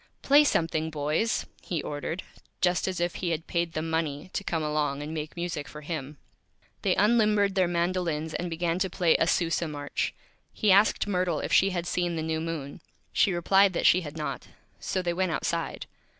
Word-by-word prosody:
"Play 285 +2 +6
something, 160 - +1
Boys," 155 +8 0 0.2
he 170 - -3
Ordered, 150 +5 -4 0.4
just 180 -1 +2
as 185 -2 -2
if 175 0 0
he 180 - 0
had 165 0 -2
paid 170 -2 -1
them 160 +1 -3
Money 160 +1 -2
to - - -2
come 165 -4 -1
along 150 -2 -1
and 155 +2 -6
make 155 -1 -5
Music 170 -4 -3
for 150 - -9
him. 150 -2 -5 0.6
They - - +2
unlimbered 210 -2 +3
their 185 -2 +3
Mandolins 170 -2 -1
and 180 - -2
began 170 +1 -1
to 190 0 0
play 175 -2 +2
a 165 - +2
Sousa 170 0 +1
March. 145 -2 -3 0.4
He 210 -3 +2
asked 200 +3 +4
Myrtle 180 -5 0
if - - -3
she 195 - +5
had 175 -2 -2
seen 175 -1 -1
the 160 - -2
New 160 0 -1
Moon. 160 -4 -5 0.3
She 200 - +3
replied 190 +3 +4
that - - -1
she 180 - +6
had 155 -1 -8
not, 155 - -4 0.3
so 185 - -2
they 175 -1 0
went 185 -1 0
Outside. - - -2
170 Hz, 195 wpm, -27 LUFS, 155-185 Hz, 0.6 s, Play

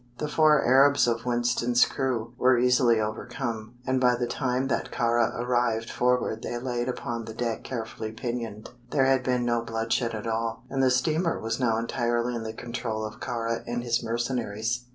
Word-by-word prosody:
The 150 - -2
four 150 -1 +4
Arabs 135 +2 +5
of 115 +1 -1
Winston's 120 0 +3
crew 120 -3 -2
were 130 -1 +5
easily 125 -2 +4
overcome, 110 +1 -4
and 130 -1 +1
by 125 -1 +4
the 120 0 -1
time 130 +1 -1
that 130 - -1
Kāra 120 -2 +1
arrived 120 -2 0
forward 125 -3 +1
they 120 - -4
laid 120 0 -2
upon 120 -2 -4
the 110 - -8
deck 115 -1 -2
carefully 110 -3 -5
pinioned. 115 -2 -5 0.2
There 135 0 +2
had 135 -1 +3
been 125 -1 0
no 120 -1 +1
bloodshed 115 +1 -1
at 105 - -6
all, 115 0 -2
and 135 0 0
the 130 - +4
steamer 155 +7 +1
was 115 +2 -3
now 115 -3 +2
entirely 120 +1 0
in 120 - -3
the 110 0 -4
control 115 -1 -4
of 110 - -8
Kāra 115 -1 -2
and 120 0 -2
his 120 0 +1
mercenaries. 120 0 -2
120 Hz, 180 wpm, -27 LUFS, 115-125 Hz, 0.2 s, Arabs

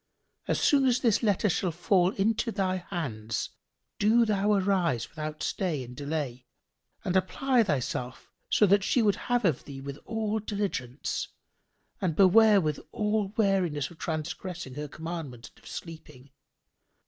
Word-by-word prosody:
As - - +1
soon 275 -2 +4
as 250 -1 +3
this 230 -6 +3
letter 210 -2 +2
shall 180 -1 0
fall 175 +2 +2
into 220 +3 +1
thy 190 -3 0
hands, 130 - -4 0.5
do 225 +3 +4
thou 205 -1 +1
arise 185 - +1
without 155 -1 -5
stay 165 -8 -1
and 125 0 -10
delay 140 -4 -4 0.6
and 185 - 0
apply 240 +7 +2
thyself 130 - -2 0.2
to 210 - +5
that 200 0 +3
we 245 - +4
would 205 -2 +3
have 245 -3 0
of 160 -8 +1
thee 140 -2 -8
with 140 +1 -7
all 220 -1 -1
diligence 200 - -3 0.7
and 175 -5 0
beware 205 +3 +6
with 155 -5 -1
all 210 -1 0
wariness 180 - +1
of 165 - -15
transgressing 165 -1 -4
her 150 +2 -5
commandment 155 -6 -7
and - - -22
of - - -11
sleeping. 145 -5 -9
180 Hz, 150 wpm, -28 LUFS, 150-210 Hz, 0.7 s, beware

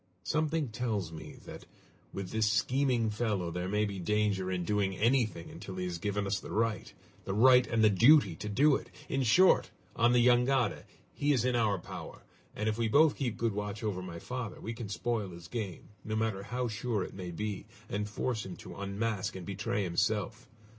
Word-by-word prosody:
Something 155 -2 0
tells 110 -7 -2
me 80 -1 -9
that - - -10 0.4
with 95 -2 -6
this 110 -1 +2
scheming 120 +1 +1
fellow 105 -6 -1
there 90 +2 -3
may 105 +1 +1
be 100 -2 -4
danger 100 0 0
in 90 -2 -2
doing 100 -2 0
anything 115 -7 +1
until 95 - -8
he 90 - -3
has 85 -2 -4
given 105 +2 -1
us 100 0 0
the - - -10
right 115 0 -1 0.3
the 95 - -3
right 125 +2 +6
and 115 -1 +1
the 110 - +7
duty 115 - +6
to 105 - -5
do 140 +7 +4
it. - - -5 0.2
In 135 - 0
short, 175 +11 +5 0.3
on 120 +1 +4
the 120 -1 +4
jangada, 125 -1 +3 0.3
he 145 +1 +1
is 125 -3 +1
in 125 -1 +2
our 110 -4 +2
power, 85 - -9 0.3
and 105 - -2
if 110 +1 -1
we 115 - +2
both 145 +6 +5
keep 120 -5 -2
good 115 -2 0
watch 105 +2 -4
over 100 -4 -2
my 90 -2 -7
father, 125 +2 -5
we 115 - -5
can 115 -3 -7
spoil 110 -1 -2
his 85 -1 -10
game, 100 -4 -5
no 110 - -3
matter 110 -3 -1
how 125 +4 -2
sure 110 -2 -2
it - - -8
may 90 -2 -6
be, 100 +3 -4 0.2
and 105 +1 -3
force 110 +1 -2
him 95 -2 -7
to - - -10
unmask 100 +1 -2
and 90 -2 -7
betray 100 +1 -2
himself! 105 +5 -1
105 Hz, 200 wpm, -31 LUFS, 100-120 Hz, 0.4 s, the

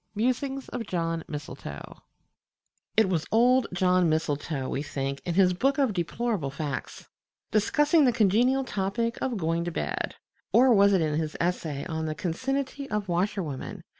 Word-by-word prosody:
MUSINGS 265 +4 -1
OF 235 -3 -5
JOHN 165 -2 -1
MISTLETOE 140 - -8 1.0
It 220 -2 +5
was 170 -4 -1
old 250 +2 +4
John 180 -1 +3
Mistletoe, 150 -3 -1
we 140 - -2
think, 140 -2 -3
in 175 - -2
his 185 -1 +5
"Book 270 +9 +1
of 270 -7 +2
Deplorable 190 - -1
Facts," 140 0 -5 0.4
discussing 295 +8 +3
the 250 - +5
congenial 240 +4 +3
topic 230 +1 -2
of 255 -4 -1
"Going 165 -1 0
to 175 - -3
Bed" - - -3 0.4
(or 255 +1 +6
was 200 -1 +5
it 190 - +3
in 155 -1 0
his 155 -1 -3
essay 160 -5 -1
on 160 -1 -3
"The 155 - -3
Concinnity 270 - -3
of 210 -2 -2
Washerwomen?") 175 -5 -2
185 Hz, 155 wpm, -27 LUFS, 160-240 Hz, 1.0 s, or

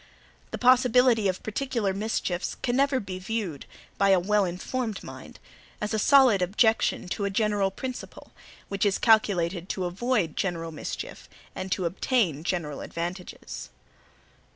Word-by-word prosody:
The - - -5
possibility 250 -3 +4
of 185 -1 -2
particular 225 -3 -1
mischiefs 195 -3 -2
can 240 -1 +1
never 275 0 +2
be 190 -4 -6
viewed, 185 -7 -4 0.3
by 200 0 +4
a 190 -1 +6
wellinformed 205 +4 -1
mind, - - -10 0.4
as 210 0 -3
a 220 - +1
solid 255 -5 +5
objection 215 +3 +2
to 200 +2 -2
a - - 0
general 205 -1 +1
principle, 255 +6 -7 0.4
which 200 -1 -2
is 200 -2 +2
calculated 190 -5 +2
to 185 - -2
avoid 190 -2 0
general 165 -3 -2
mischiefs 155 - -7 0.2
and 190 - -6
to 185 - -2
obtain 175 - 0
general 165 -5 -3
advantages. 175 - -6
200 Hz, 135 wpm, -27 LUFS, 180-230 Hz, 0.4 s, a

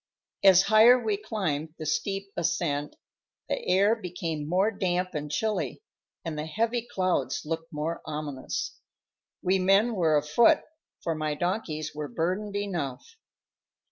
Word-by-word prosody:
As 190 -1 +8
higher 220 +4 +7
we 220 -4 0
climbed 165 -8 -3
the 155 - -6
steep 195 +5 -2
ascent, 165 -4 -1 0.5
the - - -2
air 200 +4 +4
became 165 -7 -4
more 190 +5 +3
damp 185 -2 -1
and 150 -1 -4
chilly, 215 - -2 0.4
and 155 -2 -3
the 155 - -3
heavy 230 +7 -1
clouds 185 -3 0
looked 165 +2 -4
more 155 +2 -3
ominous. 150 -3 -4 0.6
We 190 +1 +2
men 195 +5 +4
were 165 -6 +3
afoot, 230 - +4 0.4
for 165 - 0
my 155 -1 -2
donkeys 170 -3 -2
were 150 0 -4
burdened 185 +7 -2
enough. 180 - -4
180 Hz, 135 wpm, -27 LUFS, 155-205 Hz, 0.6 s, As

